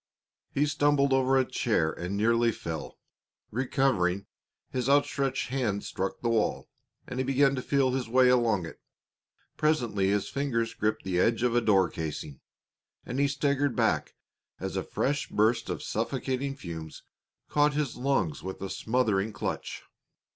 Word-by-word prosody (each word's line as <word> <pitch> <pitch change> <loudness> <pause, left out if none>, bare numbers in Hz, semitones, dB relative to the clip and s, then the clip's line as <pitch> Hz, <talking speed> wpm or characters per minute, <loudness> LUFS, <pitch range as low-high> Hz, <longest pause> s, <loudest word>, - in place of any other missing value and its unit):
He 145 - +2
stumbled 145 -1 +2
over 135 0 +3
a 130 - +3
chair 85 -13 +1
and 90 +3 -4
nearly 115 +2 +3
fell. 85 -6 -6 0.5
Recovering, 110 -7 +1 0.5
his 125 0 -1
outstretched 140 -2 +1
hands 120 -7 -1
struck 95 0 -3
the 120 - 0
wall, 115 -2 0 0.4
and 125 - -5
he - - +2
began 135 +1 +3
to 130 - -2
feel 135 -1 +2
his 125 -2 -2
way 130 +1 +5
along 115 -7 +3
it. - - -10 0.8
Presently 120 -11 +1
his 100 0 +1
fingers 115 -5 -1
gripped 110 +1 -1
the 90 -2 -1
edge 115 +4 +2
of 125 -2 +2
a 120 - +4
door 95 -5 +4
casing, 75 -3 -5 0.7
and 125 - -3
he 140 - +4
staggered 140 -2 0
back - - +1 0.4
as - - -4
a - - 0
fresh 145 +2 -1
burst 110 +3 +2
of - - -3
suffocating 135 +1 -2
fumes 80 - -8 0.4
caught 145 0 +2
his 145 -4 -1
lungs 125 - 0
with 95 0 -6
a 95 - -4
smothering 110 -4 0
clutch. - - -4
125 Hz, 155 wpm, -28 LUFS, 100-135 Hz, 0.8 s, way